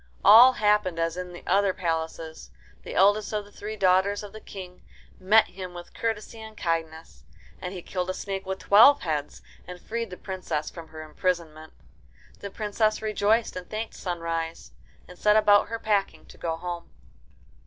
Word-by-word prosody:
All 235 Hz, +6 st, +9 dB
happened 210 Hz, -6 st, +1 dB
as 165 Hz, 0 st, -1 dB
in 180 Hz, 0 st, -6 dB
the 175 Hz, -, -11 dB
other 200 Hz, -1 st, +2 dB
palaces. 160 Hz, -2 st, -4 dB, 0.3 s
The -, -, -8 dB
eldest 205 Hz, +2 st, +3 dB
of 210 Hz, -1 st, -2 dB
the 205 Hz, -, -17 dB
three 215 Hz, +1 st, -7 dB
daughters 195 Hz, +2 st, +2 dB
of 205 Hz, -1 st, -10 dB
the 215 Hz, -, -9 dB
King 180 Hz, -2 st, -10 dB, 0.4 s
met 215 Hz, +4 st, +4 dB
him 180 Hz, -1 st, -8 dB
with 175 Hz, 0 st, -10 dB
courtesy 225 Hz, 0 st, -4 dB
and 220 Hz, -1 st, -11 dB
kindness. 165 Hz, -1 st, -4 dB, 0.4 s
And 180 Hz, -, -5 dB
he 180 Hz, -3 st, -8 dB
killed 180 Hz, -1 st, -3 dB
a -, -, 0 dB
snake 195 Hz, -1 st, -4 dB
with 190 Hz, 0 st, -2 dB
twelve 230 Hz, +10 st, +6 dB
heads 150 Hz, -4 st, -3 dB, 0.2 s
and 180 Hz, 0 st, -8 dB
freed 230 Hz, +3 st, -4 dB
the 180 Hz, -, -9 dB
Princess 185 Hz, -5 st, -4 dB
from 165 Hz, -2 st, -10 dB
her 155 Hz, 0 st, -9 dB
imprisonment. 160 Hz, -1 st, -3 dB, 0.7 s
The 200 Hz, -, -6 dB
Princess 215 Hz, +1 st, 0 dB
rejoiced, 215 Hz, +1 st, +1 dB
and 180 Hz, -1 st, -7 dB
thanked 220 Hz, +1 st, -4 dB
Sunrise, 165 Hz, -2 st, -4 dB, 0.4 s
and 180 Hz, -, -14 dB
set 210 Hz, 0 st, +4 dB
about 205 Hz, -1 st, +5 dB
her 230 Hz, -, -4 dB
packing 205 Hz, -3 st, -1 dB
to -, -, -14 dB
go 165 Hz, -1 st, -2 dB
home. 175 Hz, 0 st, -6 dB
190 Hz, 175 wpm, -26 LUFS, 170-210 Hz, 0.7 s, All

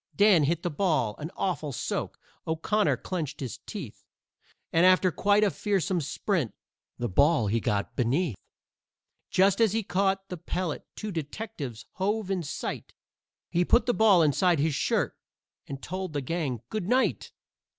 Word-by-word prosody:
Dan 200 Hz, -7 st, +5 dB
hit 170 Hz, +3 st, 0 dB
the 175 Hz, -, -1 dB
ball 150 Hz, -, +1 dB
an 155 Hz, +2 st, -5 dB
awful 170 Hz, -6 st, -1 dB
soak, -, -, -3 dB, 0.3 s
O'Connor 200 Hz, +7 st, +1 dB
clenched 155 Hz, -6 st, -4 dB
his 130 Hz, -4 st, -5 dB
teeth, 165 Hz, -, -7 dB, 0.7 s
And 165 Hz, -, +4 dB
after 185 Hz, 0 st, +5 dB
quite 205 Hz, +4 st, +3 dB
a 205 Hz, -, +3 dB
fearsome 190 Hz, -3 st, 0 dB
sprint, 155 Hz, -, -1 dB, 0.4 s
the 120 Hz, -, -1 dB
ball 140 Hz, -, +3 dB
he 110 Hz, +3 st, +1 dB
got 100 Hz, -2 st, -1 dB
beneath. 130 Hz, -, +1 dB, 0.9 s
Just 195 Hz, +3 st, +3 dB
as 220 Hz, -3 st, +4 dB
he 225 Hz, 0 st, 0 dB
caught 195 Hz, +1 st, 0 dB
the 180 Hz, -, -5 dB
pellet 175 Hz, 0 st, -3 dB
two 215 Hz, -1 st, -5 dB
detectives 150 Hz, -, -5 dB
hove 200 Hz, +1 st, -1 dB
in 190 Hz, -2 st, 0 dB
sight; 145 Hz, -, -5 dB, 0.6 s
He 175 Hz, -, +3 dB
put 235 Hz, +5 st, +3 dB
the 245 Hz, -, +2 dB
ball 205 Hz, -7 st, +5 dB
inside 170 Hz, +4 st, +3 dB
his 150 Hz, +2 st, +1 dB
shirt -, -, 0 dB, 0.5 s
and 135 Hz, -1 st, -7 dB
told 185 Hz, -1 st, -4 dB
the 145 Hz, -, -1 dB
gang 135 Hz, -5 st, -3 dB
"GOOD 210 Hz, -5 st, -3 dB
NIGHT!" 255 Hz, +3 st, +1 dB
175 Hz, 155 wpm, -28 LUFS, 145-195 Hz, 0.9 s, Dan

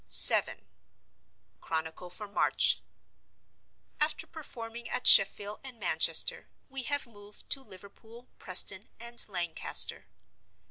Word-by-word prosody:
VII. -, -, +6 dB, 1.1 s
Chronicle 160 Hz, +2 st, -9 dB
for 210 Hz, +4 st, -11 dB
March. 200 Hz, -, -2 dB, 1.2 s
After 300 Hz, +1 st, -4 dB
performing 235 Hz, -7 st, -13 dB
at -, -, -7 dB
Sheffield 205 Hz, +1 st, +6 dB
and 255 Hz, -4 st, -15 dB
Manchester, 485 Hz, -1 st, 0 dB, 0.2 s
we 270 Hz, 0 st, -8 dB
have 285 Hz, +2 st, -5 dB
moved 205 Hz, -3 st, -19 dB
to 275 Hz, -, 0 dB
Liverpool, 225 Hz, +3 st, -19 dB
Preston, 190 Hz, +2 st, +1 dB
and 235 Hz, +1 st, -3 dB
Lancaster. 175 Hz, -4 st, -3 dB
225 Hz, 100 wpm, -25 LUFS, 195-250 Hz, 1.2 s, VII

